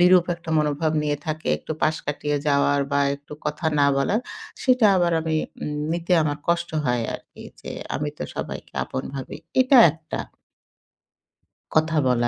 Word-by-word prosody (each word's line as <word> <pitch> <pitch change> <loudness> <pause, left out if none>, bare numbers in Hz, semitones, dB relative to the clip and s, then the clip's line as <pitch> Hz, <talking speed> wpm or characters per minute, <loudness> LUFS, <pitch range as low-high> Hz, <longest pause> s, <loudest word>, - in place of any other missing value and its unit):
বিরূপ 180 0 +6
একটা 170 -1 -9
মনোভাব 150 +1 +1
নিয়ে 145 -1 0
থাকে, 155 0 -3
একটু - - -5
পাশ 155 +1 +3
কাটিয়ে 145 0 -1
যাওয়ার 140 0 +3
বা 140 - +3 0.2
একটু 145 +1 -15
কথা 150 +2 -2
না 140 - +5
বলার, 170 - +1 0.4
সেটা 255 -4 +4
আবার 175 -1 +2
আমি 160 -1 -1 0.3
উম 150 - -3 0.2
নিতে 170 +1 -1
আমার 145 -1 -1
কষ্ট 170 0 +1 0.2
হয় 125 -1 +1
আরকি। - - -11 0.2
যে, - - -8 0.3
আমি 150 +1 -2
তো - - -4
সবাইকে - - -6
আপন 130 - -4
ভাবি। 135 -2 -6 0.2
এটা 255 0 +6
একটা। 160 -1 -7 1.6
কথা 160 +1 +3
বলা 120 -1 +2
155 Hz, 160 wpm, -24 LUFS, 145-170 Hz, 1.6 s, বিরূপ